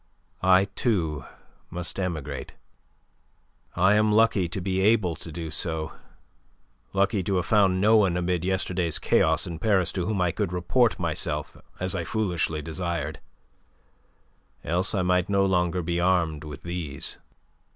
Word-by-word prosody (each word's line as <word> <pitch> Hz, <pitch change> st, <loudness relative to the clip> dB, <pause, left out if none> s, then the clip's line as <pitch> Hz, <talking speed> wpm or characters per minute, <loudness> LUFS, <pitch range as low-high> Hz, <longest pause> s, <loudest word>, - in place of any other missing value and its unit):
I, 95 Hz, +1 st, +5 dB
too, 90 Hz, -, -1 dB, 0.4 s
must 90 Hz, +2 st, -4 dB
emigrate. 75 Hz, -7 st, -4 dB, 1.2 s
I 95 Hz, +3 st, +4 dB
am 105 Hz, 0 st, +3 dB
lucky 105 Hz, -5 st, +3 dB
to 95 Hz, -, -4 dB
be 95 Hz, +1 st, -1 dB
able 100 Hz, -5 st, +3 dB
to 80 Hz, -, -9 dB
do 80 Hz, 0 st, -6 dB
so, 80 Hz, 0 st, -2 dB, 1.0 s
lucky 100 Hz, +1 st, +1 dB
to 95 Hz, +2 st, -1 dB
have 90 Hz, -1 st, 0 dB
found 95 Hz, -3 st, +3 dB
no 110 Hz, +3 st, +5 dB
one 95 Hz, -5 st, +3 dB
amid 90 Hz, -1 st, -1 dB
yesterday's 90 Hz, -3 st, -1 dB
chaos -, -, +2 dB
in 85 Hz, -2 st, -6 dB
Paris 95 Hz, -5 st, +2 dB
to 90 Hz, -2 st, -2 dB
whom 105 Hz, -3 st, -1 dB
I 90 Hz, -1 st, +2 dB
could 85 Hz, -, -2 dB
report 95 Hz, +7 st, +2 dB
myself 80 Hz, -4 st, -2 dB, 0.2 s
as 95 Hz, +1 st, -1 dB
I 90 Hz, -3 st, -2 dB
foolishly 85 Hz, -5 st, -1 dB
desired, 85 Hz, +1 st, -3 dB, 1.4 s
else 90 Hz, +6 st, +1 dB
I 95 Hz, -, +1 dB
might 90 Hz, +1 st, +1 dB
no 100 Hz, -1 st, +3 dB
longer 90 Hz, -1 st, +1 dB
be 85 Hz, +1 st, -1 dB
armed 85 Hz, -4 st, +1 dB
with 75 Hz, 0 st, -9 dB
these." 85 Hz, -5 st, -4 dB
90 Hz, 145 wpm, -26 LUFS, 85-95 Hz, 1.4 s, I